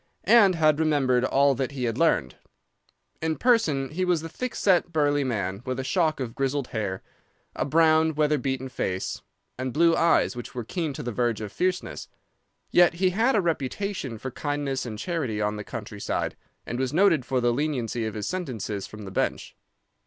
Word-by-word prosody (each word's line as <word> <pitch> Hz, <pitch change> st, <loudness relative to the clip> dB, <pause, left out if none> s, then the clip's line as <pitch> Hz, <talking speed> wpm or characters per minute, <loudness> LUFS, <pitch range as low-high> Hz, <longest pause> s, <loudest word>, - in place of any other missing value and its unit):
And 205 Hz, -6 st, +6 dB
had 155 Hz, -2 st, +3 dB
remembered 140 Hz, -6 st, +2 dB
all 140 Hz, +1 st, +3 dB
that 135 Hz, +1 st, -3 dB
he 130 Hz, -2 st, -4 dB
had 115 Hz, -2 st, 0 dB
learned. 115 Hz, -, +2 dB, 0.9 s
In 160 Hz, 0 st, 0 dB
person 160 Hz, -, +2 dB
he 180 Hz, +5 st, -2 dB
was 175 Hz, -3 st, +1 dB
a 165 Hz, -, -6 dB
thick 250 Hz, +9 st, -5 dB
set, 180 Hz, -3 st, +2 dB
burly 145 Hz, -2 st, +2 dB
man 100 Hz, -6 st, -2 dB
with 130 Hz, 0 st, -3 dB
a -, -, -2 dB
shock 160 Hz, +1 st, +1 dB
of 120 Hz, -4 st, -4 dB
grizzled 135 Hz, 0 st, -1 dB
hair, 100 Hz, -4 st, -3 dB, 0.5 s
a -, -, -1 dB
brown, 160 Hz, +1 st, +4 dB
weather 150 Hz, -1 st, +2 dB
beaten 130 Hz, 0 st, -2 dB
face, 95 Hz, -7 st, -3 dB, 0.4 s
and 130 Hz, 0 st, -2 dB
blue 165 Hz, +4 st, +4 dB
eyes 165 Hz, -6 st, +3 dB
which 120 Hz, 0 st, -8 dB
were 120 Hz, -, -3 dB
keen 165 Hz, -, -3 dB
to -, -, -6 dB
the 120 Hz, -, -3 dB
verge 120 Hz, -1 st, 0 dB
of 105 Hz, -2 st, -6 dB
fierceness. 185 Hz, 0 st, -2 dB, 0.6 s
Yet 175 Hz, -1 st, +5 dB
he 185 Hz, +1 st, +2 dB
had 225 Hz, +7 st, +2 dB
a 210 Hz, -, +4 dB
reputation 165 Hz, -, -2 dB
for 130 Hz, +4 st, -6 dB
kindness 145 Hz, -1 st, -2 dB
and 110 Hz, -2 st, -6 dB
charity 135 Hz, -6 st, -2 dB
on 105 Hz, 0 st, 0 dB
the 105 Hz, -, -5 dB
country 105 Hz, -2 st, -7 dB
side, -, -, -2 dB, 0.3 s
and 120 Hz, -, -4 dB
was 130 Hz, -1 st, 0 dB
noted 170 Hz, -4 st, +4 dB
for 130 Hz, +1 st, 0 dB
the 120 Hz, -1 st, +2 dB
leniency 125 Hz, -5 st, -1 dB
of 110 Hz, -, -6 dB
his 105 Hz, -, -3 dB
sentences 110 Hz, -, -4 dB
from 110 Hz, -1 st, -10 dB
the 95 Hz, -, -8 dB
bench. -, -, -2 dB
135 Hz, 190 wpm, -26 LUFS, 120-165 Hz, 0.9 s, And